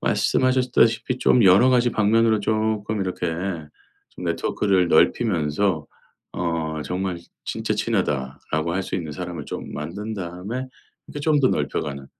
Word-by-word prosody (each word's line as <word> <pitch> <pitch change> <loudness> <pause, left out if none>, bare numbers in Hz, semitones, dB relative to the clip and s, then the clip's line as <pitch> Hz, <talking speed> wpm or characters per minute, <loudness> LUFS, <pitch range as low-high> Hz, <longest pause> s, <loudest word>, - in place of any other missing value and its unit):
말씀하셨다시피 130 -1 +2
좀 125 -3 +4
여러 95 +7 +7
가지 125 -1 +3
방면으로 110 0 +3
쪼끔 110 0 -1
이렇게 95 -2 -2 0.8
좀 - - -9
네트워크를 95 -4 +1
넓히면서 80 - +2 0.5
어 80 -3 -2
정말 90 0 -3 0.3
'진짜 - - -2
친하다.'라고 75 +4 -1
할 95 +1 -1
수 - - -5
있는 80 -4 -5
사람을 90 +2 -6
좀 - - -6
만든 100 +9 -5
다음에 95 +7 -5 0.4
이렇게 145 - -7
좀 150 0 +3
더 130 - +4
넓혀가는 70 -1 -2
95 Hz, 310 characters per minute, -23 LUFS, 80-110 Hz, 0.8 s, 여러